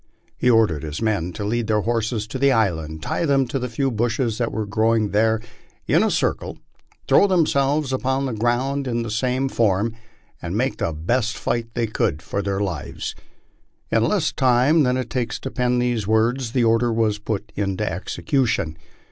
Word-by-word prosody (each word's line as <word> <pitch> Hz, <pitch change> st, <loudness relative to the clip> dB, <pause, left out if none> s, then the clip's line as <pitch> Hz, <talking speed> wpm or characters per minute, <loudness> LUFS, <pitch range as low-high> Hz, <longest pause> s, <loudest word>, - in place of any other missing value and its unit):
He 125 Hz, -, +1 dB
or 115 Hz, -2 st, +6 dB
dered 80 Hz, -6 st, -4 dB
his 75 Hz, -1 st, -5 dB
men 100 Hz, -6 st, 0 dB
to 105 Hz, -, -5 dB
lead 115 Hz, +1 st, -1 dB
their 105 Hz, -1 st, +2 dB
horses 115 Hz, -1 st, -1 dB
to 110 Hz, +4 st, -6 dB
the 140 Hz, 0 st, +4 dB
island, 80 Hz, -9 st, 0 dB
tie -, -, -1 dB
them 140 Hz, -4 st, +3 dB
to 130 Hz, +2 st, -3 dB
the 125 Hz, 0 st, -3 dB
few 135 Hz, +3 st, -1 dB
bushes 115 Hz, 0 st, -1 dB
that 120 Hz, -, 0 dB
were 110 Hz, -1 st, -2 dB
growing 110 Hz, +1 st, +1 dB
there 110 Hz, +1 st, +2 dB, 0.5 s
in -, -, +3 dB
a -, -, +2 dB
circle, -, -, -1 dB, 0.5 s
throw 205 Hz, -, +5 dB
themselves 150 Hz, -5 st, +2 dB
upon 130 Hz, +1 st, 0 dB
the 130 Hz, -, -2 dB
ground 125 Hz, +5 st, 0 dB
in 120 Hz, -1 st, -1 dB
the 115 Hz, -, -5 dB
same 130 Hz, +4 st, 0 dB
form, 110 Hz, -2 st, +1 dB, 0.5 s
and 85 Hz, +4 st, -3 dB
make 130 Hz, +3 st, 0 dB
the -, -, -1 dB
best 115 Hz, -, -1 dB
fight 115 Hz, -2 st, -2 dB
they 120 Hz, -1 st, +1 dB
could 85 Hz, -7 st, -1 dB
for 100 Hz, +5 st, -2 dB
their 100 Hz, 0 st, -2 dB
lives. 90 Hz, -8 st, -4 dB, 0.8 s
In -, -, +3 dB
less -, -, +1 dB
time 130 Hz, +5 st, +4 dB
than 125 Hz, -2 st, +2 dB
it 125 Hz, -3 st, -4 dB
takes 120 Hz, -1 st, -2 dB
to 130 Hz, -, -5 dB
pen 125 Hz, -1 st, +1 dB
these 120 Hz, -4 st, 0 dB
words, 115 Hz, +3 st, +1 dB
the 125 Hz, -3 st, +2 dB
order 115 Hz, +1 st, +3 dB
was 110 Hz, -2 st, +1 dB
put 105 Hz, 0 st, -4 dB
into 100 Hz, +1 st, -1 dB
execution. 95 Hz, -, -1 dB
115 Hz, 190 wpm, -22 LUFS, 105-130 Hz, 0.8 s, or